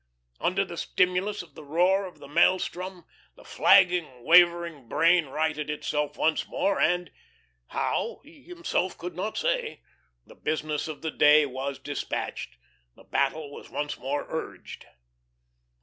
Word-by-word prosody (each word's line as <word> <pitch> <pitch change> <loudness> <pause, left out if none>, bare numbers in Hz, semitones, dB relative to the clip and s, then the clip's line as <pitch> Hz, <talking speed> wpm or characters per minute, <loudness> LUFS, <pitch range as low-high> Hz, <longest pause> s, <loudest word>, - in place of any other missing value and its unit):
Under 195 +2 +1
the 175 -2 -9
stimulus 185 +4 0
of 175 - -19
the - - -11
roar 180 +6 +2
of 180 - -14
the - - -12
maelstrom, 180 +3 +1 0.3
the - - -16
flagging, 180 -10 +3
wavering 170 -6 +4
brain 165 0 +3
righted 155 +1 -2
itself 150 0 -2
once 160 0 +1
more, 200 - 0
and 175 0 +1 0.6
how, - - -2
he 300 0 -18
himself 345 - -3
could 175 -1 -7
not 205 +5 -3
say - - -1 0.4
the - - -15
business 155 -1 -2
of 155 -1 -8
the 160 - -2
day 150 0 +6
was 135 +1 -4
despatched, 145 - -5 0.4
the - - -17
battle 145 +1 -1
was - - -11
once 145 0 -4
more 140 +3 -2
urged. 160 - -7
170 Hz, 140 wpm, -27 LUFS, 150-185 Hz, 0.6 s, day